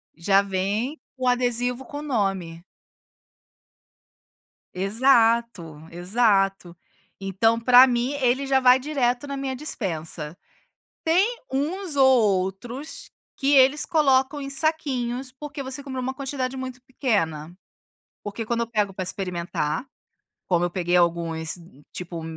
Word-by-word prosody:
Já 195 +4 +3
vem 200 +9 -2 0.2
o 255 - -2
adesivo 245 0 0
com 290 -3 -7
o - - -6
nome. 195 - -2 2.1
Exato, 225 - +1
exato. 195 -1 +1 0.4
Então 195 +4 +1
pra 250 +2 +7
mim 245 +2 0
ele 260 +2 +1
já 270 0 +3
vai 255 0 +6
direto 260 -2 -1
na 280 - -5
minha 270 -1 -3
dispensa. 165 - -3 0.7
Tem 385 +9 +2
uns 320 +6 -2
ou 270 -1 +6 0.4
outros 240 +10 -7 0.3
que 275 0 +1
eles 270 +2 +5
colocam 285 -3 +2
em 275 - -5
saquinhos, 270 -4 -1
porque 285 +1 -7
você 265 +2 -5
comprou 260 -2 -5
uma 260 +1 -3
quantidade 265 -1 -4
muito 255 -1 -6
pequena. 175 - -2 0.7
Porque 210 +2 -5
quando 235 +1 -1
eu 235 - -2
pego 210 -3 0
pra 190 - -4
experimentar, 175 - -3 0.6
como 175 -1 +1
eu 175 - -1
peguei 175 -1 0
alguns, 165 -2 0 0.4
tipo, 170 -2 -7
240 Hz, 125 wpm, -24 LUFS, 185-270 Hz, 2.1 s, pra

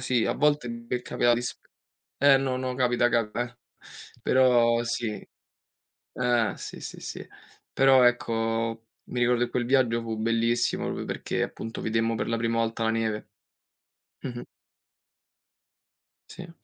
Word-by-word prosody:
sì, 125 -3 +1
a - - 0
volte, 145 -5 +1
beh 115 +1 -4
è - - -16
capitato 120 -1 +2
di 120 - -2
sc - - -5 0.6
eh, 140 -1 +6
no, 135 -1 -1
no, 130 0 -3
capita 120 -1 +2
cap 115 -3 0
eh, 120 0 -3 0.6
però, 120 -2 +4
sì. 115 -2 -3 0.9
Eh, 120 -4 +1
sì, - - -8
sì, - - -8
sì. - - -7 0.5
Però, 135 -1 +5
ecco, 115 -1 0 0.2
mi 125 - -4
ricordo 120 0 +3
che 120 - -6
quel 120 0 -1
viaggio 120 -2 +2
fu 115 -1 -4
bellissimo 115 +2 +1
proprio - - -4
perché, - - -2
appunto, 115 - -5
vedemmo 115 +1 0
per 110 - -2
la 115 - 0
prima 115 0 0
volta 115 0 -1
la 110 - +2
neve. 110 -1 -1 1.0
Mh-mh. - - -5 1.8
Sì. 175 -1 -10
120 Hz, 150 wpm, -27 LUFS, 115-125 Hz, 1.8 s, eh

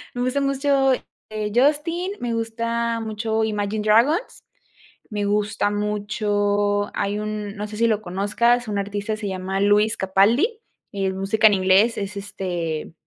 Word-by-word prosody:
me 245 - -2
gusta 255 +3 0
mucho, 275 -1 +2 0.4
eh, 215 -1 -3
Justin, 310 +8 +1
me 240 -1 -2
gusta 230 +1 -2
mucho 220 0 -2
Imagine 210 -1 -2
Dragons, 240 - +2 0.7
me 205 -1 -2
gusta 205 0 0
mucho 205 0 0
hay 205 +1 -1
un, 210 -1 -4
no 210 +1 -4
sé 210 0 -8
si 230 - +2
lo 215 -2 +1
conozcas, 215 +6 +1
un 205 -1 -1
artista 205 +2 -3
se 210 -1 -5
llama 190 +1 -3
Lewis 210 +2 +3
Capaldi, 230 - +2 0.3
es 195 -1 -1
música 205 +4 +1
en 210 - +4
inglés, 190 +5 +3
es 200 0 -5
este 175 -6 -4
210 Hz, 145 wpm, -22 LUFS, 205-230 Hz, 0.7 s, en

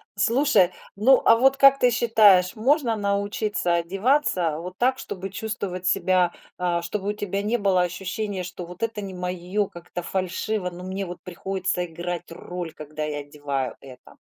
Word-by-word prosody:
Слушай, 230 -2 +3 0.2
ну, 245 +6 +5
а 230 - +7
вот 265 +3 +4
как 275 0 +6
ты 245 - +4
считаешь, 210 -6 +5
можно 245 +1 +2
научиться 200 -2 -1
одеваться 185 - +1
вот 180 +2 -8
так, 255 +2 +2
чтобы 195 0 -6
чувствовать 195 -3 -4
себя, 185 -2 +2 0.2
а, 175 -1 0
чтобы 195 +4 -3
у - - 0
тебя 205 -2 -3
не 215 +4 0
было 195 -4 +2
ощущения, 190 +2 -3
что 180 0 -7
вот 180 +5 -9
это 225 -2 -2
не 195 -2 -6
моё, 180 +3 -2
как-то 175 0 -8
фальшиво, 185 +2 -2
но 175 +1 -9
мне 190 +1 -4
вот 175 -1 -8
приходится 185 0 -2
играть 175 +1 -5
роль, 175 -1 -6
когда 155 0 -6
я 150 -1 -3
одеваю 140 -3 -4
это? 130 -2 -14
185 Hz, 165 wpm, -24 LUFS, 175-210 Hz, 0.2 s, а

